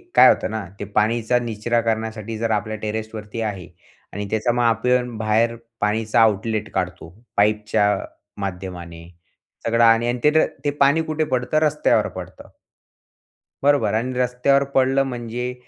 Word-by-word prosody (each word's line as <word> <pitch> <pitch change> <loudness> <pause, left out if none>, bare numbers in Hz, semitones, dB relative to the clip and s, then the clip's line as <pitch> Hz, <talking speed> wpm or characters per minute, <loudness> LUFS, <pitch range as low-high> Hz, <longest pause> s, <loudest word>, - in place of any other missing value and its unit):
काय - - +9
होतं - - +1
ना, 110 -1 -3 0.2
ते - - -4
पाणीचा 115 +3 +2
निचरा 115 0 -1
करण्यासाठी 110 -1 -3
जर 115 0 -1
आपल्या 110 0 -1
टेरेसवरती 110 0 -5
आहे 100 -6 -4 0.5
आणि 105 0 -4
त्याच्यामध्ये 120 +3 +1 0.3
आपण 125 -1 -2
बाहेर 110 +2 +1 0.3
पाणीचा 110 +2 +1
आउटलेट 110 0 +1
काढतो 90 -3 -3 0.3
पाईपच्या 105 0 +2 0.6
माध्यमाने 90 -3 -6 0.6
सगळं, 115 0 +3
आणि 115 +1 +5
आणि 120 +1 -1
ते 150 - +5 0.3
ते - - +3
पाणी 140 +3 +4
कुठे 155 0 -1
पडतं, 130 +1 -1
रस्त्यावर 150 -1 +2
पडतं. - - -10 1.1
बरोबर? 140 -8 +3
आणि 120 +4 -1
रस्त्यावर 125 +3 +2
पडलं 135 +1 +3
म्हणजे 125 -1 -4
115 Hz, 135 wpm, -22 LUFS, 105-125 Hz, 1.1 s, काय